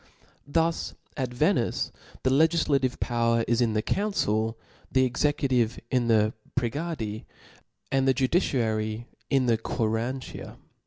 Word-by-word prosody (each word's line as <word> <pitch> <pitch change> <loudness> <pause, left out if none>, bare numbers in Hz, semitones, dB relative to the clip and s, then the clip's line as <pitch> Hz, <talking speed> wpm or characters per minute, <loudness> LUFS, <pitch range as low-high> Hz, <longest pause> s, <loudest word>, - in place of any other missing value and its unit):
Thus 165 +3 0 0.2
at 130 -3 -2
Venice 125 - +1 0.3
the 130 - +2
legtdative 145 -3 +2
power 115 -1 +1
is 120 +1 +2
in 115 -2 +2
the 110 0 0
council^ 115 - 0 0.4
the 130 0 +4
executive 130 -3 +1
in 125 -2 +2
the 110 -1 +3 0.3
pregadi^ 120 -4 -3 0.7
and 135 0 +2
the 135 - +5
judiciary 115 - 0 0.2
in 135 -2 +3
the 115 -2 +2
quarantia. 115 +3 -3
125 Hz, 115 wpm, -27 LUFS, 115-140 Hz, 0.7 s, the